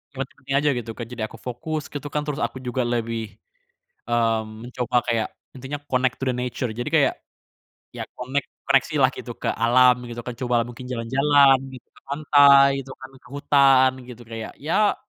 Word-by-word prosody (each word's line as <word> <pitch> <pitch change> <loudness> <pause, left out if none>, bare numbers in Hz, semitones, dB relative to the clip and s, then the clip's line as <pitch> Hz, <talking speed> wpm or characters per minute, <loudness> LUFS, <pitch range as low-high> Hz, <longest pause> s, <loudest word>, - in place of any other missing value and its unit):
Nggak. 135 0 -4 0.2
Aja 145 +2 +3
gitu 120 -2 -5
kan, 120 - -5
jadi 120 -2 -6
aku 115 - -13
fokus 150 +6 -5
gitu 145 0 -7
kan, 150 - 0
terus 150 +1 -3
aku - - -3
juga 125 0 -2
lebih, 115 -3 -2 0.8
mmm, 115 -1 -1
mencoba 125 0 -1
kayak 115 -2 0 0.3
intinya 135 +3 -6
connect 130 -1 0
to 135 - -3
the 125 - -1
nature, 125 -1 -3
jadi 120 +5 -4
kayak 155 -4 +3 0.8
ya - - -4
connect, 130 +3 -3 0.2
koneksi 135 +3 +2
lah 130 - +6
gitu 120 - -7
ke - - -2
alam 125 +1 +5
gitu 120 0 -6
kan. 125 - -4
Cobalah 120 -2 0
mungkin 120 +1 -10
jalan-jalan 135 +3 +4 0.2
gitu 125 - -12
ke - - -22
pantai 140 -1 +6
gitu 130 - -11
kan, 130 - -11
ke - - -19
hutan 135 -2 +4 0.2
gitu 120 0 -10
kayak 115 -1 -7
ya 185 +8 +2
125 Hz, 180 wpm, -23 LUFS, 120-140 Hz, 0.8 s, lah